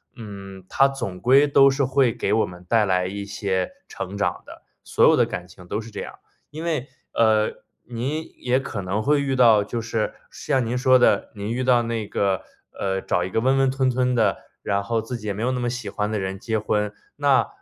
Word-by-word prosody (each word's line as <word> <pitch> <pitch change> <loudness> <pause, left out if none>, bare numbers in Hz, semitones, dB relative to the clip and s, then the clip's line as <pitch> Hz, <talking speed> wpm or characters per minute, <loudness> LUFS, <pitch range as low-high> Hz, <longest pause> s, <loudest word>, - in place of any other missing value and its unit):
嗯， 100 -4 -10
它 135 - +4
总 120 -10 -5
归 135 +4 +5
都 140 -1 +6
是 135 +1 0
会 130 -1 +3
给 105 - -1
我 110 - +3
们 90 0 -12
带 110 +1 +3
来 90 -2 +1
一 100 +2 -4
些 100 -2 -2 0.2
成 100 +2 -6
长 100 - -1
的， - - -13 0.2
所 - - +3
有 - - +6
的 - - +3
感 90 0 -6
情 90 0 -15
都 105 - -2
是 115 +1 -9
这 - - -7
样。 - - -8 0.3
因 155 +2 -7
为， 155 -6 -2 0.2
呃， 110 -1 +3 0.3
您 135 +7 -4
也 125 +1 +1
可 115 -6 -5
能 100 +3 -2
会 145 +2 +3
遇 135 -1 -1
到 115 -5 +5
就 115 +3 -4
是 115 -1 -2 0.2
像 135 -4 -1
您 115 +2 -2
说 130 0 +5
的， 125 - +2
您 105 +1 -4
遇 125 +2 -1
到 125 -2 +4
那 115 -2 -3
个 95 -3 0 0.3
呃， 95 -1 -2
找 90 -2 0
一 90 - -3
个 115 - 0
温 130 +3 +3
温 135 0 +3
吞 130 -1 +1
吞 125 0 +1
的， 110 -4 +2 0.3
然 100 -1 0
后 115 +3 -1
自 115 +3 -5
己 105 -2 -8
也 100 - -1
没 105 +3 -4
有 125 - +1
那 125 - -2
么 120 0 -1
喜 125 +1 -5
欢 105 -1 -2
的 110 - -1
人 95 0 -4
结 110 +1 -1
婚。 105 -1 -1 0.3
那 140 -2 +3
115 Hz, 245 characters per minute, -23 LUFS, 100-130 Hz, 0.3 s, 都